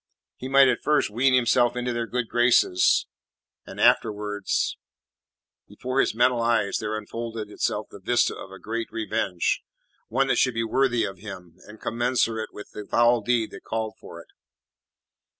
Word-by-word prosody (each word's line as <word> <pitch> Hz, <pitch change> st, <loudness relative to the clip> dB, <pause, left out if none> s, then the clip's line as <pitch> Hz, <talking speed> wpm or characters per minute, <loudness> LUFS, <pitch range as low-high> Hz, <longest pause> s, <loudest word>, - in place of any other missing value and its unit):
He 130 Hz, -, -7 dB
might 135 Hz, 0 st, +6 dB
at 125 Hz, -, +1 dB
first 150 Hz, -7 st, +1 dB
wean 130 Hz, +4 st, +3 dB
himself 120 Hz, 0 st, +3 dB
into 125 Hz, 0 st, -2 dB
their 115 Hz, 0 st, -2 dB
good 125 Hz, -1 st, -2 dB
graces, 120 Hz, -6 st, +3 dB, 0.6 s
and -, -, -9 dB
afterwards 105 Hz, -2 st, +1 dB, 0.9 s
Before 130 Hz, +1 st, -3 dB
his -, -, +2 dB
mental 120 Hz, 0 st, +3 dB
eyes 115 Hz, -4 st, +1 dB
there 110 Hz, 0 st, -3 dB
unfolded 110 Hz, 0 st, -6 dB
itself 105 Hz, 0 st, -2 dB
the 100 Hz, -, -11 dB
vista 120 Hz, +6 st, +1 dB
of -, -, -9 dB
a 95 Hz, -, -10 dB
great 115 Hz, +3 st, -5 dB
revenge; 110 Hz, -5 st, -1 dB, 0.5 s
one 135 Hz, +4 st, +1 dB
that 135 Hz, -, +1 dB
should 130 Hz, -3 st, +2 dB
be 115 Hz, -, 0 dB
worthy 120 Hz, 0 st, +1 dB
of 95 Hz, -2 st, -7 dB
him, 90 Hz, -4 st, -10 dB
and 105 Hz, +1 st, -13 dB
commensurate 115 Hz, -2 st, -1 dB
with 105 Hz, -, -11 dB
the 105 Hz, -1 st, -8 dB
foul 120 Hz, 0 st, +3 dB
deed 115 Hz, 0 st, 0 dB
that -, -, -11 dB
called 110 Hz, -1 st, -3 dB
for 85 Hz, -, -11 dB
it. -, -, -15 dB
115 Hz, 165 wpm, -25 LUFS, 105-125 Hz, 0.9 s, might